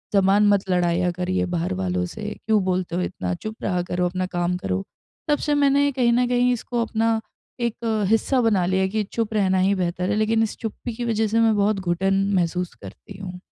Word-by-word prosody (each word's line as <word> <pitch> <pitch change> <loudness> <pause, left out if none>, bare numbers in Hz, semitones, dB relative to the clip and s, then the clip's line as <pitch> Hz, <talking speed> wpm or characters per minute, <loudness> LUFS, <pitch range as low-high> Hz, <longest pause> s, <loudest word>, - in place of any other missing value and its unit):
ज़बान 200 +2 +4
मत 200 -1 +2
लड़ाया 180 0 +2
करिए 180 +1 -1
बाहर 175 +1 -2
वालों 180 -1 -1
से 210 +3 -6
क्यों 215 -2 +3
बोलते 180 -2 -1
हो 180 - 0
इतना? 90 - -3
चुप 215 - -6
रहा 180 -2 0
करो, 180 0 -1
अपना 185 +1 -1
काम 175 0 -1
करो। 95 - -2 0.5
तब 295 - +4
से 295 -1 0
मैंने 285 0 +3
कहीं 245 -3 +2
न 245 +1 +2
कहीं 245 0 +2
इसको 240 0 -2
अपना, 225 0 0 0.4
एक 225 -2 -1
हिस्सा 250 +3 +2
बना 210 -6 +2
लिया 190 +1 +2
कि 215 +2 -1
चुप 225 -2 -1
रहना 190 -3 +2
ही 195 +2 +3
बेहतर 180 0 -1
है - - +1
लेकिन 220 +1 +2
इस 220 - -3
चुप्पी 230 +1 -5
की 240 +1 -4
वज़ह 225 -1 +1
से 225 +2 +1
मैं 225 -1 +4
बहुत 205 0 +2
घुटन 195 +2 +1
महसूस 180 0 -1
करती 95 - -12
हूँ। 180 -2 -7
195 Hz, 210 wpm, -23 LUFS, 180-225 Hz, 0.5 s, ज़बान